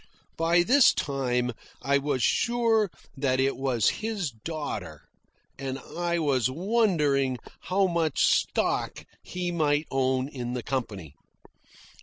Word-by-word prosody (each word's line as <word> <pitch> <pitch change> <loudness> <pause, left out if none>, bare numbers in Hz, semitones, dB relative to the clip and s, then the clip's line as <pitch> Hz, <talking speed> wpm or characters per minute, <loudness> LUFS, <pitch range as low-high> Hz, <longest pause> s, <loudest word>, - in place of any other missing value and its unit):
(By 170 +2 +3
this 260 +7 +5
time 125 -3 -1 0.3
I 140 +2 +3
was 140 -3 -1
sure 230 -3 +2 0.3
that 135 -2 0
it 135 +1 +2
was 130 -5 +1
his 210 -9 -2
daughter, 150 +7 -6 0.6
and 135 -1 -3
I 170 +5 -3
was 135 -7 +1
wondering 150 - +1 0.3
how 195 +1 +3
much 170 -4 0
stock - - 0 0.2
he 180 -1 -4
might 150 -2 +1
own 130 0 +1
in 125 -4 -5
the 125 -2 -4
company.) 100 - -4
145 Hz, 120 wpm, -27 LUFS, 130-175 Hz, 0.6 s, this